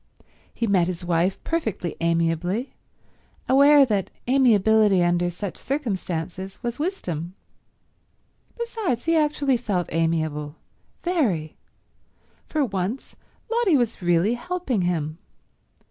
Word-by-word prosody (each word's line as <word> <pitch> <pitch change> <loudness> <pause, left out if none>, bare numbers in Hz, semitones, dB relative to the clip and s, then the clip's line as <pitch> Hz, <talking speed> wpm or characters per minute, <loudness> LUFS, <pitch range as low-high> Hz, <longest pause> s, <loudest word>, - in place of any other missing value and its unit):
He 235 - -2
met 190 -5 +3
his 180 -1 -5
wife 175 +2 +1
perfectly 220 - -2
amiably, 170 - 0 0.7
aware 280 +2 +7
that 205 -6 -1 0.2
amiability 220 -6 +4
under 175 0 +2
such 180 +2 -6
circumstances 190 - -3
was 240 +3 -3
wisdom. 180 - -3 1.2
Besides, 450 - -2
he 330 0 +2
actually 295 -4 +2
felt 200 -7 -2
amiable—very. 165 - -2 0.9
For 305 -3 0
once, 200 +3 -4 0.4
Lotty 455 -9 +3
was 240 -6 -1
really 175 +5 +2
helping 335 - -2
him. 165 -2 -2
200 Hz, 100 wpm, -24 LUFS, 175-275 Hz, 1.2 s, aware